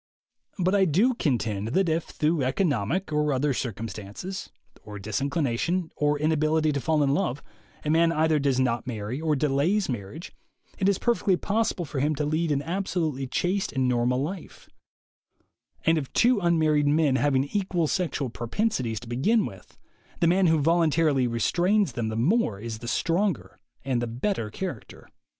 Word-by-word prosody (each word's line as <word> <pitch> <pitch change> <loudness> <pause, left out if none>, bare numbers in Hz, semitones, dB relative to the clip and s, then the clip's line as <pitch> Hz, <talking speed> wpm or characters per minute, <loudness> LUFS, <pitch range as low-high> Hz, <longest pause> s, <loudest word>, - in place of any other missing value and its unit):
But 185 0 +1
I 200 -1 +4
do 195 - +3
contend 115 - -1
that 190 -1 +3
if, 165 0 0
through 155 0 0
economic 150 - 0
or 150 0 +1
other 140 +1 +1
cir 125 -1 -2
cumstances, 110 - -7 0.3
or 105 -1 -8
disinclination, 140 - -1
or 150 0 +1
inability 155 +1 +1
to 140 -1 -2
fall 155 0 +2
in 140 -1 +2
love, 140 -1 -1 0.4
a 150 - +1
man 165 +1 +4
either 160 -1 +2
does 140 -2 +1
not 120 -2 0
marry 115 +3 -4
or 155 -2 +1
delays 150 +8 +1
marriage, 120 - -6 0.5
it 190 - +3
is 200 - +2
perfectly 230 -6 +1
possible 205 -4 -1
for 140 -2 -4
him 150 +3 +1
to 150 +1 -1
lead 155 +2 0
an 145 -1 0
absolutely 165 -6 -2
chaste 185 +8 -1
and 130 -2 +1
normal 125 +1 +1
life; 180 +3 -7 1.2
and 165 0 +4
of 135 - -7
two 240 -1 +4
unmarried 155 -4 +2
men 145 -2 +3
having 135 -2 +2
equal 180 0 -1
sexual 155 -7 -1
propensities 120 - -2
to 120 - -11
begin 150 - +2
with, - - -11 0.4
the 175 - +2
man 180 +2 +4
who 160 -1 +4
voluntarily 155 -4 +2
restrains 175 - +1
them 115 -2 -3
the 110 - -4
more 120 - +1
is 110 0 -6
the 120 - -8
stronger 175 - -1 0.3
and 130 -3 0
the 120 - -2
better 120 - -2
character. 185 - -7
150 Hz, 165 wpm, -26 LUFS, 125-175 Hz, 1.2 s, I